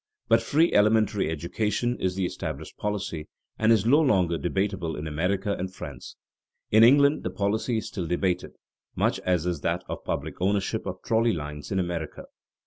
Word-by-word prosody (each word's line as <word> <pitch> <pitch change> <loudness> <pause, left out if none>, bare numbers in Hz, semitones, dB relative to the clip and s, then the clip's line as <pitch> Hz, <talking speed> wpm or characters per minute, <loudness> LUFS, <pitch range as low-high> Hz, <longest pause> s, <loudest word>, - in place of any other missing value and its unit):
But 115 0 +4
free 155 +8 +2
elementary 105 -3 +3
education 105 +9 -1
is 90 -1 -1
the 95 -1 0
established - - -5
policy, 100 -7 -3 0.3
and 110 +1 +4
is 110 -3 +4
no 145 +7 +5
longer 90 - +2
debatable 95 -2 -1
in 75 - -5
America 90 +6 -1
and 95 +1 -3
France. - - -9 0.6
In 110 +1 +7
England 140 +4 +6
the - - -3
policy 100 +5 -1
is 110 - -4
still 90 -5 -4
debated, 90 +1 -1 0.4
much - - +1
as 90 -3 0
is 85 -4 -2
that - - -1
of - - -6
public - - -4
ownership 100 +1 0
of - - -6
trolley 115 0 +2
lines 75 -2 -6
in 95 - 0
America. 85 -4 -3
95 Hz, 170 wpm, -26 LUFS, 90-110 Hz, 0.6 s, In